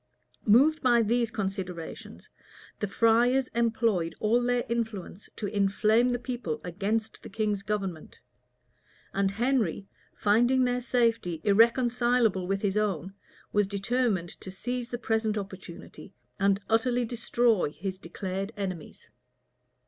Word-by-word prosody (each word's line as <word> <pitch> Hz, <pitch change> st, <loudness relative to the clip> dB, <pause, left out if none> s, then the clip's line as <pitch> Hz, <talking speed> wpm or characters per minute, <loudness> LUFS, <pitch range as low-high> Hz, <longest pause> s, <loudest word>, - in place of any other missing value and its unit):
Moved 280 Hz, +9 st, +5 dB
by 240 Hz, -2 st, +4 dB
these 235 Hz, +1 st, +1 dB
considerations, 190 Hz, -5 st, -5 dB, 0.5 s
the 210 Hz, -, -1 dB
friars 240 Hz, +5 st, +3 dB
employed 225 Hz, -7 st, 0 dB
all 230 Hz, +3 st, +2 dB
their 245 Hz, 0 st, 0 dB
influence 220 Hz, -5 st, -4 dB
to 215 Hz, -, -4 dB
inflame 210 Hz, +4 st, +2 dB
the 245 Hz, -, 0 dB
people 245 Hz, -10 st, -4 dB
against 205 Hz, +5 st, -2 dB
the -, -, -10 dB
king's 210 Hz, -1 st, -1 dB
government; 195 Hz, -6 st, -4 dB, 1.0 s
and 195 Hz, 0 st, +1 dB
Henry, 225 Hz, -3 st, 0 dB, 0.3 s
finding 240 Hz, +5 st, +3 dB
their 250 Hz, 0 st, 0 dB
safety 230 Hz, -9 st, 0 dB
irreconcilable 235 Hz, -2 st, +3 dB
with 195 Hz, +1 st, -1 dB
his 200 Hz, 0 st, 0 dB
own, 195 Hz, -3 st, -1 dB, 0.4 s
was 205 Hz, -1 st, +3 dB
determined 200 Hz, -2 st, 0 dB
to -, -, -8 dB
seize 245 Hz, +5 st, -4 dB
the 240 Hz, -, -3 dB
present 220 Hz, -2 st, 0 dB
opportunity, 190 Hz, -1 st, -9 dB, 0.2 s
and 200 Hz, 0 st, +2 dB
utterly 240 Hz, +2 st, +2 dB
destroy 235 Hz, -5 st, +1 dB
his 185 Hz, +5 st, -6 dB
declared 190 Hz, +3 st, -5 dB
enemies. 185 Hz, -6 st, -6 dB
215 Hz, 120 wpm, -28 LUFS, 195-240 Hz, 1.0 s, Moved